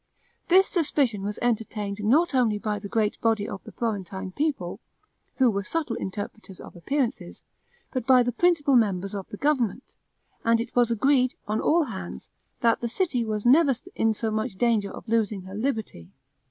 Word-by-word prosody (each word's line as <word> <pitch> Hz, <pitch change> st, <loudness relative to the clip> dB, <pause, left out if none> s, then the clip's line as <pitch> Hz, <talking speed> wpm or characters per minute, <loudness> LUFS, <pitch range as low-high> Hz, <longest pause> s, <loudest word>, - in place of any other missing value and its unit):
This 375 Hz, +2 st, +6 dB
suspicion 280 Hz, -, +1 dB
was 205 Hz, +2 st, -4 dB
entertained 210 Hz, -3 st, -2 dB
not 295 Hz, +10 st, +3 dB
only 235 Hz, -5 st, +2 dB
by 210 Hz, 0 st, -2 dB
the 200 Hz, -, -7 dB
great 215 Hz, -1 st, 0 dB
body 220 Hz, -2 st, +1 dB
of 195 Hz, -, -7 dB
the -, -, -9 dB
Florentine 195 Hz, -4 st, -4 dB
people, 220 Hz, -, -2 dB, 0.6 s
who 255 Hz, -3 st, +4 dB
were 200 Hz, -1 st, -2 dB
subtle 300 Hz, 0 st, -2 dB
interpreters 205 Hz, -1 st, -6 dB
of -, -, -11 dB
appearances, 260 Hz, +7 st, -2 dB, 0.5 s
but 255 Hz, -2 st, -3 dB
by 255 Hz, -2 st, +6 dB
the 245 Hz, -, -1 dB
principal 290 Hz, 0 st, +3 dB
members 195 Hz, -4 st, +1 dB
of 195 Hz, -2 st, -6 dB
the 205 Hz, -, -7 dB
government; 255 Hz, -5 st, 0 dB, 0.5 s
and 230 Hz, 0 st, +3 dB
it 230 Hz, +1 st, -5 dB
was 240 Hz, -1 st, +4 dB
agreed, 255 Hz, +2 st, +2 dB
on 215 Hz, +1 st, 0 dB
all 335 Hz, +1 st, +3 dB
hands, 190 Hz, -, -7 dB, 0.3 s
that 230 Hz, -1 st, +3 dB
the 240 Hz, -, -1 dB
city 260 Hz, 0 st, 0 dB
never 240 Hz, +9 st, +3 dB
was 250 Hz, -, -5 dB
in 225 Hz, -1 st, +2 dB
so 220 Hz, +1 st, -2 dB
much 215 Hz, -2 st, -2 dB
danger 220 Hz, -2 st, +1 dB
of -, -, -10 dB
losing 215 Hz, -4 st, 0 dB
her 190 Hz, +1 st, -10 dB
liberty. 215 Hz, -, -3 dB
225 Hz, 175 wpm, -26 LUFS, 205-255 Hz, 0.6 s, This